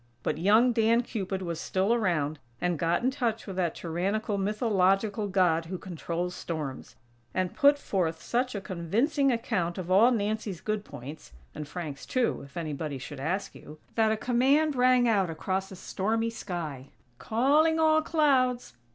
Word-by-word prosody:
But - - -1
young 215 +7 +5
Dan 230 +1 +3
Cupid 190 -5 -4
was 170 -2 -4
still 195 +4 +1
around, 160 -10 0 0.2
and 175 -3 -1
got 170 +6 +1
in 255 - +2
touch 235 -4 -2
with 195 - -6
that 175 -3 0
tyrannical 195 +6 -2
mythological 205 0 +1
god 180 -4 +2
who 185 +3 -5
controls 175 0 -4
storms; 155 -7 -6 0.4
and 185 -1 0
put 285 -1 +5
forth 170 - -1
such 250 0 -1
a 200 - -3
convincing 230 - 0
account 180 -7 -1
of 185 -1 -5
all 210 +6 +6
Nancy's 215 -5 -2
good 215 +1 -2
points, 140 - -10 0.2
(and 150 -1 -6
Frank's 150 -4 -6
too, 255 -2 0
if 140 +3 -12
anybody 155 -3 -4
should 135 +2 -8
ask 180 +8 -2
you) 150 +1 -12 0.2
that 220 -1 +3
a 220 - 0
command 270 +6 +2
rang 250 -1 +4
out 200 -6 +2
across 190 +4 -3
a - - -7
stormy 225 +5 -1
sky: 160 - -5 0.3
"Calling 295 +8 +3
all 315 0 +4
clouds!! 265 - +1
195 Hz, 160 wpm, -28 LUFS, 170-235 Hz, 0.4 s, all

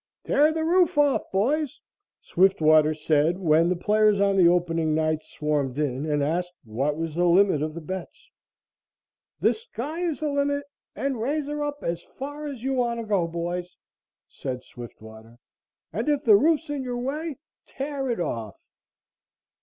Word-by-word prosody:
"Tear 300 +2 +3
the 320 0 -2
roof 345 -1 +3
off, 290 -2 +2
boys!" 290 +9 0 0.4
Swiftwater 155 -4 +4
said 155 +2 +2
when 165 -2 +3
the 180 - +1
players 210 +2 +3
on 200 0 +3
the 180 -3 +6
opening 165 -3 +1
night 155 0 0
swarmed 145 -4 -2
in 145 0 -1
and 150 -1 +1
asked 175 +4 -1
what 135 +7 -2
was 165 -1 -3
the 175 +2 +1
limit 180 -3 +4
of 155 +1 -3
the 170 - -6
bets. 185 +3 -8 1.1
"The - - +4
sky 325 - -6
is 335 -6 -1
the 305 - -1
limit 285 0 0 0.3
and 270 -4 -2
raise 290 +5 -1
her 295 +1 -3
up 290 0 -4
as 170 0 -2
far 290 +8 -7
as 265 -5 -7
you 270 +1 0
want 240 -2 0
to 230 - -5
go, 200 -5 +1
boys," 175 +2 -4 0.5
said 125 -1 -6
Swiftwater, 110 -1 -12 0.6
"and - - -1
if 290 -2 +1
the 215 -3 +7
roof's 310 +6 +2
in 285 -2 -2
your 250 -1 -4
way, 290 +5 -3 0.3
tear 275 -1 -4
it 235 - -1
off!" 115 - -3
195 Hz, 165 wpm, -25 LUFS, -, 1.1 s, the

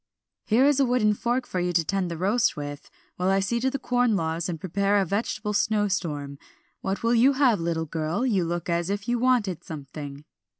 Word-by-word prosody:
"Here 235 +5 +4
is 285 -1 +3
a 275 - +4
wooden 235 -4 +3
fork 245 +4 -1
for 185 - -3
you 180 0 0
to 165 -1 +3
tend 190 +1 -1
the 170 - -5
roast 205 +5 +1
with, 145 -1 -6 0.3
while 180 +1 0
I 195 0 +3
see 210 +5 0
to 260 +2 +1
the 275 - -3
corn 245 -3 +1
laws 165 -1 -1
and 165 -2 -4
prepare 200 +4 +1
a 195 - +2
vegetable 210 +2 -2
snowstorm. 185 -10 -1 0.4
What 195 +2 -3
will 230 +1 +3
you 250 +4 +5
have, 260 -7 +3
little 165 -1 -1
girl, 160 - -2
you 205 -8 +2
look 170 0 -3
as 170 0 0
if 200 +2 -3
you 240 0 +1
wanted 235 -8 +1
something?" 145 -1 -8
195 Hz, 210 wpm, -25 LUFS, 165-235 Hz, 0.4 s, you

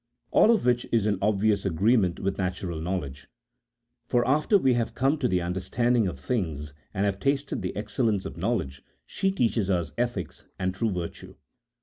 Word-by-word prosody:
All - - +5
of 225 - +3
which 120 -1 +2
is 115 -3 +2
in 105 -3 +1
obvious 105 0 +2
agreement 95 +1 +2
with 100 0 -2
natural 90 -3 -3
knowledge: 80 -6 -4 0.8
for 120 -1 +2
after 155 +9 +4
we 135 -9 +3
have 120 -1 -1
come 135 +4 +2
to 130 - +2
the 90 -5 +1
understanding 105 +6 +1
of 90 - -5
things, 80 - -3 0.2
and 100 0 0
have 100 -1 -1
tasted 140 +3 0
the 95 - -4
excel 115 +4 -1
lence 100 -4 0
of - - -6
knowledge, 85 - -2 0.2
she 195 - -1
teaches 115 - 0
us 90 -3 0
ethics 120 -7 -3
and 95 0 -1
true 110 +4 0
virtue. 90 -4 -5
100 Hz, 180 wpm, -27 LUFS, 90-120 Hz, 0.8 s, All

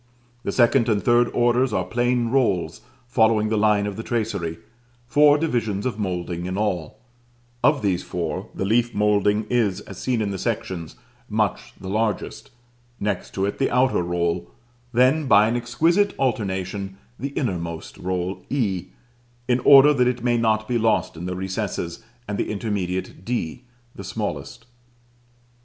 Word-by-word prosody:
The - - -2
second 120 0 +3
and 105 -2 +1
third 120 0 +4
orders 120 +1 +2
are 95 -3 0
plain 120 +3 0
rolls 100 -9 0 0.3
following 110 -3 +3
the 110 - +1
line 105 -1 +3
of 105 0 -4
the - - -3
tracery; 110 -9 -2 0.5
four 145 +4 +5
divisions 115 -10 -1
of 120 -4 -2
moulding 90 -3 -3
in 95 +1 -3
all: 95 -7 -2 0.7
of 140 -1 +3
these 95 -3 +1
four, 90 -2 -4
the 95 - -2
leaf 120 +3 +1
moulding 105 0 +2
is, 110 -6 +1
as 95 - -10
seen 125 -3 0
in 105 -2 -1
the 95 - -4
sections, 85 -3 -3 0.3
much - - -1
the 95 - -8
largest; 110 +2 -2 0.5
next 100 -3 -3
to 95 - 0
it 100 - -3
the 135 - +2
outer 125 -4 +2
roll; 85 0 -1 0.4
then, 130 +5 +3
by 105 -2 +6
an 115 - 0
exquisite 165 +12 +1
alternation, 95 -5 -2 0.2
the 140 - -3
innermost 85 - -3
roll 90 +1 -3
(e), 100 -10 -1 0.6
in 125 0 +2
order 140 +3 +8
that 125 -3 +2
it 125 -1 -1
may 120 -1 +2
not 110 -2 +1
be 120 -1 0
lost 110 -5 +1
in 85 +2 -6
the 90 - -3
recess 95 -2 -3 0.3
and 105 0 -3
the - - -1
intermediate 95 -4 -3
(d), 120 -1 -3 0.3
the 100 - -9
smallest. 110 +4 -5
110 Hz, 155 wpm, -23 LUFS, 95-120 Hz, 0.7 s, order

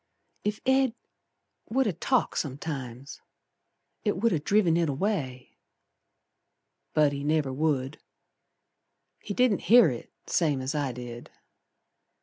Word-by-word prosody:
Ef 210 +1 -1
Ed 265 -2 +3 0.7
would 265 +3 +2
ha' 200 -7 -1
talked 255 -3 +1
sometimes 135 -3 -6 0.8
It 205 -4 0
would 230 +4 +2
ha' 155 -4 -1
driven 195 -4 +3
it 170 -2 +2
away; 135 -6 -3 1.4
But 150 -2 +4
he 140 0 -4
never 150 -3 +1
would. 140 -1 -1 1.2
He 205 - -6
didn't 250 -7 +3
hear 235 -6 +8
it 120 - -8
same 150 -6 +1
as 130 +3 -3
I 145 -3 -1
did. 120 -1 -8
155 Hz, 120 wpm, -27 LUFS, 135-210 Hz, 1.4 s, hear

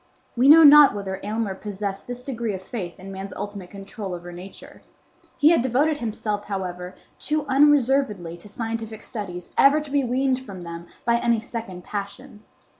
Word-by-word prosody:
We 250 +3 +4
know 325 +2 +9
not 295 -4 +9
whether 195 -1 -4
Aylmer 215 -1 -2
possessed 200 0 -5
this 245 0 -6
degree 235 -6 -3
of 190 - -8
faith 185 -5 -6
in 195 +1 -9
man's 195 0 -7
ultimate 205 -3 -7
control 195 -1 -7
over 175 0 -9
Nature. 180 +3 -11 0.6
He 300 - +6
had 335 - +4
devoted 275 +5 +1
himself, 210 -4 -3
however, 180 -2 -5 0.2
too 305 -1 -1
unreservedly 270 - +2
to 190 +4 -12
scientific 225 0 -5
studies 180 -6 -7
ever 280 +2 +6
to 300 -2 -8
be 285 -1 +2
weaned 260 +1 0
from 190 -7 -9
them 170 0 -8 0.2
by 235 0 +3
any 235 -1 +1
second 220 -6 -7
passion. 210 +4 -7
215 Hz, 170 wpm, -23 LUFS, 190-260 Hz, 0.6 s, know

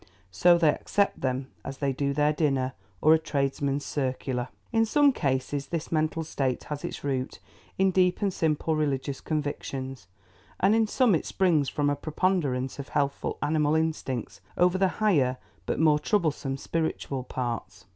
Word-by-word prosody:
So 175 - +5
they 165 -3 +4
accept 200 -1 0
them 130 0 -2
as 135 0 -6
they 140 -2 0
do 140 +1 -1
their 150 +2 +2
dinner 135 -4 0 0.3
or 155 - +6
a 160 - +4
tradesman's 140 -2 -1
circular. 130 -2 -2 0.2
In 225 -1 +3
some 285 +5 +4
cases 140 - -1
this 165 -3 -4
mental 155 0 0
state 135 -5 -2
has 150 -1 -6
its - - -5
root 135 -2 -2 0.4
in 190 0 +3
deep 180 -1 +3
and 195 -2 +1
simple 160 -1 0
religious 140 -2 -1
convictions, 135 - -4 0.5
and 195 +3 +4
in 225 0 +3
some 245 -1 +3
it 160 - 0
springs 165 -7 +2
from 145 -1 0
a 145 - +2
preponderance 145 -4 -1
of 140 - -6
healthful 140 -1 -1
animal 150 0 +2
instincts 130 -10 -2 0.2
over 180 +1 +3
the 190 - +4 0.2
higher 135 -11 +3 0.3
but - - -1
more 155 -2 +4
troublesome 150 -6 0
spiritual 145 -4 -2
parts. 120 -7 -5
145 Hz, 160 wpm, -27 LUFS, 135-165 Hz, 0.5 s, or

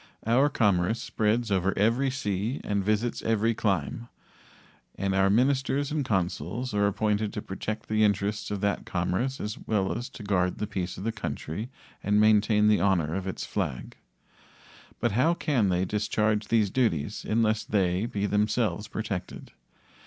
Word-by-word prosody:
Our 125 +6 +4
commerce 105 -4 +2
spreads 110 +1 0
over 95 0 +1
every 115 +7 +2
sea 110 -1 -2
and 100 -1 -1
visits 110 +4 0
every 115 0 +1
clime, 105 +1 -1 0.9
and 100 0 -1
our 95 0 +3
ministers 135 +5 +2
and 150 -1 0
consuls 95 - -2
are 100 0 +3
appointed 105 +1 0
to 105 - -4
protect 105 +3 -5
the 110 0 +2
interests 105 0 0
of 100 -2 -3
that 100 -2 0
commerce 95 +9 -1
as 105 +1 -4
well 95 -3 +1
as 120 +3 -5
to 110 - -9
guard 90 -3 0
the 105 - -2
peace 95 -3 -4
of 95 - -6
the 115 - 0
country 105 -1 -5 0.3
and 105 +1 +3
maintain 105 0 +4
the 105 -3 +4
honor 90 -5 +2
of 95 +1 -3
its 95 - -4
flag. 60 - -3 1.0
But 120 - +1
how 135 +11 +3
can 130 - +1
they 90 +1 +1
discharge 105 +1 0
these 110 -4 +2
duties 105 - 0
unless 110 -1 +1
they 95 +1 +1
be 105 -4 -2
themselves 105 -1 0
protected? 100 -5 -5
105 Hz, 160 wpm, -27 LUFS, 95-115 Hz, 1.0 s, Our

